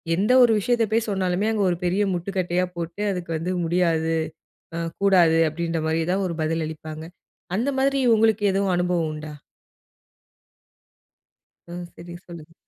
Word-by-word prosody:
எந்த 205 +7 +1
ஒரு 235 - +5
விஷயத்த 235 +2 +1
போய் 225 0 +1
சொன்னாலுமே, 190 +1 0
அங்க 210 -2 0
ஒரு 175 - -1
பெரிய 190 +4 +1
முட்டுக்கட்டையா 180 0 -1
போட்டு, 170 +3 -5
அதுக்கு 180 -3 -5
வந்து 180 +3 -3
"முடியாது, 165 -2 +1 0.6
ஆ - - -3 0.2
கூடாது" 175 -5 +5
அப்டின்ற 165 0 -3
மாதிரி 160 +1 0
தான் 195 0 0
ஒரு 170 - -4
பதில் 160 0 -1
அளிப்பாங்க. 155 0 -8 0.5
அந்த 245 +6 0
மாதிரி 275 +1 +2 0.2
உங்களுக்கு 220 -1 +2
எதுவும் 195 -1 +1
அனுபவம் 175 -3 0
உண்டா? 155 0 -7 2.4
ம். 175 0 -6
சரி, 170 0 -10
சொல்லுங்க. 165 -2 -11
175 Hz, 140 wpm, -23 LUFS, 165-200 Hz, 2.4 s, ஒரு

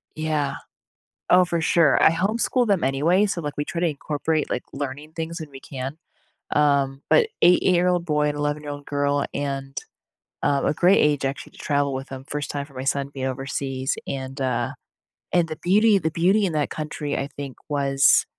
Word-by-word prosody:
Yeah. 155 -2 -1 0.7
Oh, 180 0 +6
for 170 -1 -1
sure. 160 -3 +4
I - - +7
homeschool 220 +7 +1
them 195 -4 +2
anyway, 160 +10 +3
so, 195 -4 -2
like, 145 -2 -5
we 145 - -1
try 170 - -4
to 175 - +2
incorporate, 150 +1 -2
like, - - -2
learning 145 +2 -5
things 165 +1 -4
when 155 -2 -7
we 135 - -10
can, 135 +2 -6 0.6
um, 140 -2 +2
but 465 - +5 0.2
eight-year-old 180 0 +4
boy 150 -2 +1
and 145 - -4
eleven-year-old 145 -1 -3
girl 145 0 +1
and, 135 -1 -4 0.7
um, 140 -1 +1
a - - +1
great 180 +5 +4
age 145 -2 +2
actually 135 +1 -4
to - - -18
travel 145 -2 0
with 135 +1 -5
them, 135 0 -7
1st 145 0 -3
time 140 -1 -3
for 140 - -20
my 130 0 -5
son 140 0 0
being 135 -2 -5
overseas, 135 0 -3
and, 135 0 -5
uh, 130 -3 -1 0.6
and 170 -2 +3
the 155 - -5
beauty 210 +4 +4
the 160 -4 -1
beauty 190 +6 +3
in 175 - -1
that 150 -2 0
country, 150 -1 -4
I 135 - -2
think, 140 -2 -7
was 140 -2 +4
145 Hz, 185 wpm, -23 LUFS, 140-170 Hz, 0.7 s, I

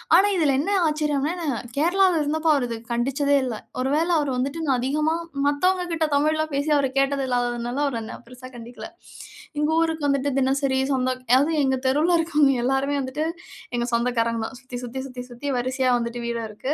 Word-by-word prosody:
ஆனா 385 +4 +6
இதுல 290 -5 +3
என்ன 360 +8 -1 0.2
ஆச்சரியம்னா 300 0 0
நான் 250 -6 -3
கேரளால 355 +2 +3
இருந்தப்போ 315 +2 0
அவர் 250 -3 0
இத 230 - -3
கண்டிச்சதே 275 +4 +1
இல்ல. 240 - -3 0.3
ஒருவேளை 300 +6 +1
அவர் 290 -3 -1
வந்துட்டு 280 +6 -2
நான் 260 -2 +3
அதிகமா 300 +5 +1 0.3
மத்தவங்ககிட்ட 340 +2 +1
தமிழ்ல 310 +2 +2
பேசி 285 +2 0
அவர் 275 -2 +1
கேட்டது 275 0 +1
இல்லாததுனால 245 +2 -1
அவர் 240 -5 -2
என்னை 220 - -7
பெருசா 255 +1 -11
கண்டிக்கல. 240 +7 -9 0.7
எங்க 300 +1 +1
ஊருக்கு 320 -3 0
வந்துட்டு 280 0 +1
தினசரி 270 0 +1 0.2
சொந்தம் 255 -1 -1
அதாவது 280 +5 +5
எங்க 265 0 +2
தெருவுல 305 +6 +3
இருக்கவங்க 300 -4 +3
எல்லாருமே 270 +2 +1
வந்துட்டு 270 +4 -3 0.5
எங்க 240 0 0
சொந்தக்காரங்க 235 -1 +1
தான். 265 - -7
சுத்தி 255 -1 -7
சுத்தி 255 +2 -6
சுத்தி 250 -1 -7
சுத்தி 245 +4 -7
வரிசையா 255 +1 0
வந்துட்டு 235 0 -4
வீடு 235 -1 -2
இருக்கு. 255 +7 -3
275 Hz, 170 wpm, -24 LUFS, 250-305 Hz, 0.7 s, ஆனா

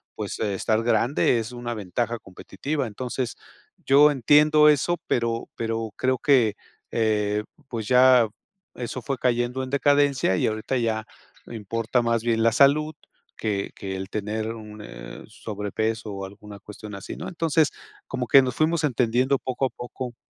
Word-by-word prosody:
pues - - -5
estar 110 +1 0
grande, 120 +2 +2
es 115 +2 -5
una 120 -1 -4
ventaja 115 +3 -3
competitiva. 130 +9 -4
Entonces, 125 +3 -4 0.5
yo 145 +2 +6
entiendo 150 +3 +5
eso, 150 +4 +2
pero 115 -1 -1
pero 115 -1 -2
creo 130 0 +1
que, 120 -7 +3 0.4
eh, 105 -2 +1 0.3
pues 115 -4 -4
ya 125 -2 +6 0.5
eso 125 +1 -5
fue 135 +4 -2
cayendo 120 +1 0
en 130 - -6
decadencia, 140 -5 +3
y - - +1
ahorita 110 +4 -2
ya 110 -2 -1 0.4
importa 115 +2 -1
más 115 -1 0
bien 115 -1 +1
la 115 - +4
salud 150 +5 +4 0.4
que 100 -3 -2
que 95 -1 -5
el 95 +1 -6
tener 110 +2 -3
un, 105 -1 -10
eh, - - -10
sobrepeso, 110 +1 -4
o, 95 0 -5
alguna 100 +1 -11
cuestión 105 +1 -10
así, 100 - -7
¿no? - - -6
Entonces 165 -3 +2 0.4
como 125 - -3
que 135 - +8
nos 125 -2 -2
fuimos 160 +2 +1
entendiendo 125 +1 +2
poco 130 +1 -2
a - - -10
poco. 120 0 -7
115 Hz, 155 wpm, -24 LUFS, 110-130 Hz, 0.5 s, que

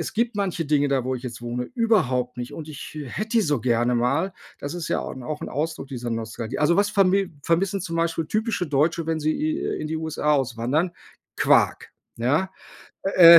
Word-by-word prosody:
es - - -3
gibt 230 -1 +1
manche 185 -4 0
Dinge, 145 -1 +3
da 135 -2 +2
wo 130 - 0
ich 125 - -10
jetzt 120 -1 -6
wohne, 120 +1 -2
überhaupt 145 - +2
nicht 120 0 -5
und 155 -1 -7
ich 150 +1 -8
hätte 215 - -4
die - - +6
so 145 - +1
gerne 120 +1 +2
mal, 145 +11 +1 0.3
das 145 +4 -4
ist 175 -2 -4
ja - - +1
au - - -5
'n 130 - -8
auch 150 +3 -4
'n - - -4
Ausdruck 155 -1 -2
dieser 125 -3 -4
Nostalgie. 115 +1 -3
Also, 150 +3 +4
was 205 0 +4
vermi 195 -2 +3
vermissen 190 +4 +1
zum 165 -2 -3
Beispiel 165 -1 0
typische 215 -1 0
Deutsche, 155 +3 +2
wenn 160 -1 0
sie 155 +1 +2
i 310 +2 0 0.2
in 155 - -3
die 160 - -1
USA 155 -1 0
auswandern? 135 +6 0 0.4
Quark, - - +3 0.3
ja. 145 +11 +1 0.5
Äh, 170 -3 +10
155 Hz, 205 wpm, -24 LUFS, 130-185 Hz, 0.5 s, Äh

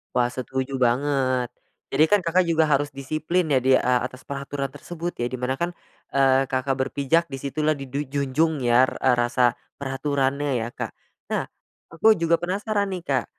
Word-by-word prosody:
Wah 120 0 +2
setuju 130 +1 -3
banget. 130 0 +1 0.4
Jadi 145 +3 +4
kan 205 - +6
Kakak 175 +1 +2
juga 165 -1 +3
harus 145 +1 +3
disiplin 155 +6 -1
ya 130 - +5
di 130 +1 +4
a 125 0 +2
atas 130 +1 -6
peraturan 140 0 -4
tersebut 170 +4 -6
ya 120 - 0
di 130 - -4
mana 130 +1 -2
kan, 175 +1 -2 0.4
eee, 135 0 +4
Kakak 130 +1 -1
berpijak 145 +5 +1
di 135 - -6
situlah 150 +3 -1
didu 135 0 -5
junjung 140 +2 0
ya 120 +2 +4
eee, 130 - +5
rasa 120 0 +3 0.2
peraturannya 140 0 -1
ya, 115 0 -2
Kak. - - -5 0.4
Nah, - - 0 0.5
aku 215 +6 +5
juga 165 0 +2
penasaran 200 +2 -1
nih, 175 - -7
Kak. 135 -5 0
140 Hz, 170 wpm, -24 LUFS, 130-160 Hz, 0.5 s, kan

